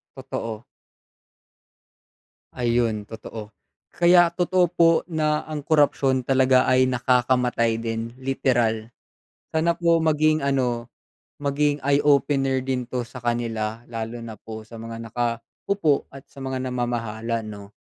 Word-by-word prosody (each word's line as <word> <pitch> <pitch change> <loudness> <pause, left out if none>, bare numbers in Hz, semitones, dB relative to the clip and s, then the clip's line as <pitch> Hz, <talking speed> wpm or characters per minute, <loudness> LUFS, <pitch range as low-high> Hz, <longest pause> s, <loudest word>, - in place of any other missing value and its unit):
Totoo. 110 -1 -5 1.9
Ayun 115 -3 0
totoo, 110 -1 -9 0.4
kaya 175 0 +5
totoo 180 +1 +2
po, 170 -1 +5
na, 155 -3 0
ang 155 -1 -5
korapsyon 140 -4 +2
talaga 130 -1 +4
ay 130 0 +4
nakakamatay 125 -2 +2
din, 115 0 -3
literal, 120 -4 0 0.6
sana 165 +2 +1
po 170 -1 +3
maging 155 -1 +2
ano, 130 -4 0 0.5
maging 145 +1 0
eye-opener 140 -1 +2
din 130 -1 -2
'to 125 -2 -2
sa 125 0 -11
kanila, 115 -1 -2
lalo 115 0 -5
na 115 -1 -8
po 110 +1 -10
sa 115 0 -10
mga 115 0 -7
naka-upo 120 - -2
at 135 0 -12
sa 135 - -12
mga 130 0 -3
namamahala 115 -2 -2
'no. 100 -1 -9
125 Hz, 120 wpm, -24 LUFS, 115-145 Hz, 1.9 s, kaya